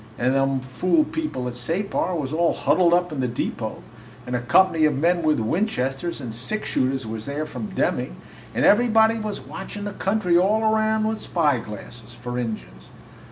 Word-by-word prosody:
And 125 +2 +1
them 135 -1 +1
fool 180 - +1
people 305 - -3
at 125 - -4
Separ 175 +8 -1
was 145 -3 -3
all 170 +1 +2
huddled 170 +5 +3
up 175 0 +2
in 150 - -4
the 130 - +1
depot, 120 - -4 0.4
and 125 - -3
a 120 - -1
company 160 +5 +4
of 150 -3 +2
men 170 +4 +2
with 155 -4 +2
Winchesters 160 - -1
and 120 -5 -6
six 125 - -3
shooters 130 -1 0
was 110 0 -5
there 145 +2 -2
from 125 -8 -6
Deming, - - 0 0.4
and - - +2
everybody 225 0 +5
was 215 -2 -4
watchin' 205 +1 -7
the 205 - -4
country 190 -4 +2
all 210 +4 +2
'round 220 0 +2
with 220 0 -2
spyglasses, 120 - -2
for 120 0 -5
Injuns! 65 - -6
155 Hz, 175 wpm, -23 LUFS, 125-195 Hz, 0.4 s, everybody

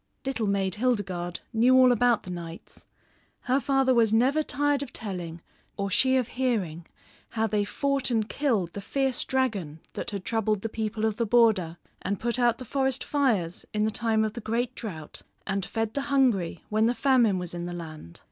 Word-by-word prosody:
Little 255 -5 -1
Maid 195 -2 0
Hildegarde 195 -7 -1
knew 245 +3 +5
all 255 -1 +7
about 245 -1 +3
the 180 - -7
knights. 170 -1 -9 0.5
Her 260 +1 +1
father 270 -1 +2
was 230 -3 +4
never 260 +7 +3
tired 290 -1 +1
of 280 - -5
telling, 175 -6 -5 0.4
or 200 -1 -2
she 260 +6 +3
of 250 -3 +1
hearing, 200 -11 -2 0.4
how 225 -1 0
they 210 -1 +1
fought 275 +5 0
and 225 -3 +1
killed 225 - 0
the 200 - -5
fierce 265 +4 0
dragon 210 - -1
that - - -4
had 200 -3 -5
troubled 215 -3 0
the 225 - -3
people 220 0 -2
of 220 -1 0
the 235 - 0
border; 205 -8 +3 0.2
and 200 +1 -2
put 240 +1 0
out 240 -1 +3
the 255 - -8
forest 265 +1 0
fires 220 - 0
in 210 0 +2
the 220 - 0
time 220 -1 +1
of 215 - -3
the 235 - -6
great 235 +3 -1
drought 165 -12 -7 0.2
and 195 -2 -2
fed 225 -1 -2
the 280 - -1
hungry 235 - +2
when 215 +1 +3
the 240 - +1
famine 245 -8 +3
was 180 -1 -4
in 175 0 -4
the - - -5
land. 155 - -8
220 Hz, 195 wpm, -27 LUFS, 195-255 Hz, 0.5 s, all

